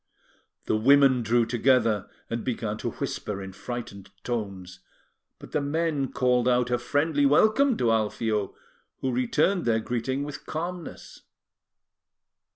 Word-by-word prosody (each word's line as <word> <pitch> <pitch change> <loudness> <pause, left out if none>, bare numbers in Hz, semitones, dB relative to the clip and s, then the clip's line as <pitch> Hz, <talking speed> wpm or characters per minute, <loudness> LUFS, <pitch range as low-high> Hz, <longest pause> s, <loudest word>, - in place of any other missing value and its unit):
The - - +1
women 135 +2 +5
drew 115 +1 +2
together, 120 -4 +2 0.2
and 115 0 -4
began 110 -4 -2
to - - -3
whisper 105 -2 -4
in 95 -1 -8
frightened 100 -3 -7
tones; 100 -6 -5 0.6
but - - -13
the 150 - 0
men 145 -2 -1
called 125 -2 +2
out 125 -1 +2
a 120 - +1
friendly 145 +3 +1
welcome 220 - +4
to 115 -2 +2
Alfio, 110 -1 -1 0.5
who 130 - 0
returned 150 +9 +1
their 115 -1 +2
greeting 125 +4 -2
with 145 -1 -8
calmness. 170 +1 -6
125 Hz, 130 wpm, -26 LUFS, 110-145 Hz, 0.6 s, women